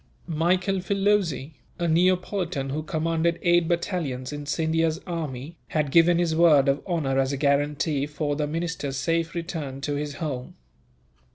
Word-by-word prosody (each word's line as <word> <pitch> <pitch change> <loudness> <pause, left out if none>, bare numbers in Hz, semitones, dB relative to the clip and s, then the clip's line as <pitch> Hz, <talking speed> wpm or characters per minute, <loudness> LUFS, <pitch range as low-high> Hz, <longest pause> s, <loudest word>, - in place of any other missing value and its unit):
Michel 180 +4 +1
Filoze, 195 -7 +1 0.3
a 175 - -1
Neapolitan 175 -3 +1
who 150 +3 -2
commanded 165 +2 0
eight 175 -1 +4
battalions 160 -7 -2
in 145 0 -6
Scindia's 160 +1 +1
army, 160 -3 -5
had 150 -3 -1
given 170 +2 +5
his 170 -2 +1
word 155 -5 +5
of 135 +1 +2
honour 145 -7 0
as 135 0 +1
a 140 - -2
guarantee 145 +1 +1
for 150 -1 -2
the 150 0 -1
minister's 160 -3 -3
safe 165 +4 -1
return 160 -6 -4
to 145 +1 -2
his 145 0 -3
home. 140 -5 -5
160 Hz, 150 wpm, -25 LUFS, 145-170 Hz, 0.3 s, given